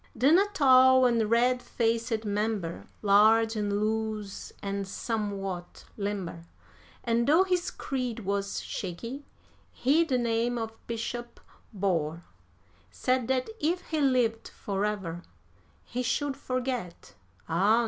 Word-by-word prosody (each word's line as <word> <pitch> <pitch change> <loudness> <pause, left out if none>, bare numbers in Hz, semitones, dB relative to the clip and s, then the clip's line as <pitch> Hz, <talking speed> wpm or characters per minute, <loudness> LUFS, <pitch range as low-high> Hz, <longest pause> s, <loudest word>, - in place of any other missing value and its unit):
Then 280 +9 +5
a 405 - +3
tall 260 -7 +6
and 230 -3 +2
red 245 +2 +3
faced 225 -2 -1
member, 205 -4 -2 0.2
large 220 +3 +5
and 205 -1 0
loose 215 -2 -2
and 200 0 -3
somewhat 195 -4 -4
limber 195 -5 -4 0.6
(And 235 0 +1
though 320 +6 +6
his 365 -2 0
creed 250 -4 -4
was 200 0 -2
shaky, 230 +10 -6 0.4
he 290 +6 +3
the 275 -6 0
name 235 0 0
of 225 -1 -4
Bishop 235 +1 -5 0.3
bore), 175 -5 -1 0.7
Said 255 - 0
that 260 +8 0
if 350 +2 0
he 315 -2 0
lived 245 -5 +2
forever, 195 -4 -3 0.6
he 250 - -4
should 280 +3 -1
forget, 250 -10 -4 0.3
ah! 195 +8 +3
225 Hz, 120 wpm, -28 LUFS, 200-255 Hz, 0.7 s, tall